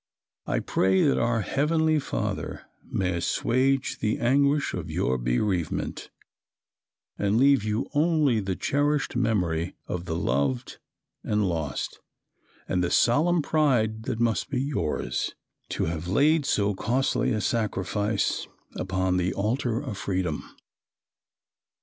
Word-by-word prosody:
I - - 0
pray 95 0 +2
that 140 - +3
our 115 -1 +1
Heavenly 155 +5 +1
Father - - -3 0.3
may 90 -2 0
assuage 130 +9 +1
the 110 0 0
anguish 140 +4 +2
of - - -4
your 65 0 0
bereavement, 80 - -1 1.1
and 105 +1 +2
leave 135 -2 +5
you 110 +3 -1
only 150 -6 +3
the 95 -2 -2
cherished 145 +3 0
memory 90 -8 0
of 90 0 -4
the 80 -2 -3
loved 65 -3 -1 0.4
and 105 -2 +1
lost, 80 -6 -3 0.7
and 90 -1 0
the 90 - 0
solemn 155 - +3
pride 120 -8 +1
that 115 -3 -2
must 120 +2 +1
be 130 -2 -1
yours, 75 - -2 0.3
to - - -1
have 80 +1 -3
laid 145 - +3
so 100 0 +2
costly 130 +5 0
a 110 - 0
sacrifice 105 -1 -1 0.3
upon 95 0 0
the 90 +1 0
altar 115 +3 0
of 125 -8 -6
Freedom." 90 -5 -2
110 Hz, 125 wpm, -26 LUFS, 90-135 Hz, 1.1 s, leave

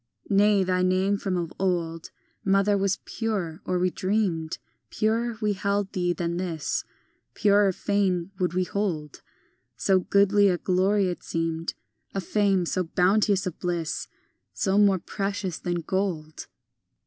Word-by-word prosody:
II - - +3
Nay, 205 -1 +5
thy 185 0 +1
name 185 +2 +2
from 190 -3 -1
of 170 -1 -3
old, 170 -3 -1 0.3
Mother, 195 +1 +3
was 195 -1 +1
pure, 195 -7 -3
or 185 - 0
we 180 0 +1
dreamed 185 -6 -1 0.3
Purer 225 +2 0
we 210 -1 +1
held 200 0 -1
thee 175 -1 0
than 170 -1 -2
this, 170 -4 -2 0.5
Purer 205 -1 +4
fain 190 -2 0
would 180 -1 0
we 185 - +2
hold; 175 -7 -3 0.6
So 190 -1 +3
goodly 200 +2 +4
a 180 - +1
glory 190 +3 +2
it 180 - -4
seemed, 165 0 -2 0.4
A - - +1
fame 195 -1 +1
so 185 +2 -1
bounteous 195 +3 +2
of 180 - -5
bliss, 175 -3 -2 0.5
So 195 0 +1
more 200 -2 +5
precious 195 -1 -3
than 175 -1 -2
gold. 170 -5 -3
190 Hz, 145 wpm, -26 LUFS, 175-200 Hz, 0.6 s, Nay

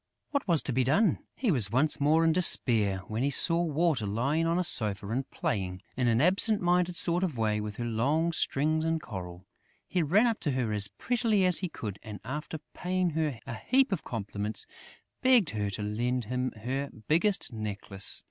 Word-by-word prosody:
What 280 -5 -2
was 170 -5 +2
to 135 - -2
be 130 +2 +2
done? 195 - +2 0.2
He 245 -6 0
was 120 - +4
once 135 +8 +2
more 155 +3 +3
in 165 - +4
despair, 110 - +4
when 110 +2 -3
he 140 - +1
saw 165 +4 +3
Water 155 -8 0
lying 140 +11 0
on 165 +1 +1
a 180 - +1
sofa 105 - +2
and 130 +4 -3
playing, 95 - -3
in 125 -1 0
an 115 0 +2
absent 195 - +3
minded 180 0 +1
sort 175 +1 +3
of 160 -9 -2
way, 105 -1 0
with 105 -1 -6
her 120 - -4
long 140 +9 0
strings 155 +2 0
of 165 0 0
coral. 90 - -8 0.4
He 180 - 0
ran 190 +10 +3
up 230 -2 0
to 145 - -2
her 120 -4 -1
as 105 -1 +4
prettily 220 -5 0
as 180 -1 +3
he 185 - -3
could 105 -9 -7
and, 105 -1 -9
after 150 +5 -5 0.2
paying 180 -1 -1
her 150 -6 -2
a - - -6
heap 260 - +1
of 195 - -2
compliments, 105 -2 -4 0.6
begged 250 -9 +4
her 105 -2 -2
to 100 +2 -5
lend 120 +4 -2
him 125 +3 -2
her 130 +5 -4 0.2
biggest 170 - +1
necklace. 100 -2 -2
140 Hz, 195 wpm, -28 LUFS, 110-175 Hz, 0.6 s, was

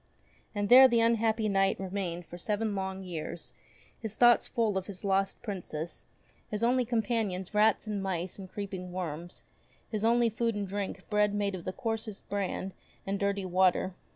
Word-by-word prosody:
And 205 0 0
there 260 +4 +10
the 235 -2 +3
unhappy 225 -1 +2
Knight 195 -1 +2
remained 185 -3 -3
for 175 - -10
seven 210 +3 -1
long 190 -1 -3
years, 170 -2 -6 0.5
his 220 -2 -5
thoughts 240 0 +5
full 225 -4 0
of 190 -1 -2
his 200 0 -7
lost 195 0 +1
Princess; 175 -5 -5 0.4
his 210 +1 -3
only 250 +1 +3
companions 220 -5 -1
rats 215 +1 +3
and 210 -2 -2
mice 185 -1 -3
and 190 -1 -9
creeping 190 -3 -5
worms, 175 -1 -5 0.5
his 215 -2 -2
only 235 +1 +4
food 230 +1 -1
and 205 -1 -2
drink 195 -1 -4
bread 210 0 +3
made 200 -1 0
of 180 -3 -6
the 185 - -1
coarsest 220 0 -4
bran 195 -1 -2 0.3
and 195 0 -2
dirty 200 -1 0
water. 185 0 +2
200 Hz, 170 wpm, -30 LUFS, 185-220 Hz, 0.5 s, there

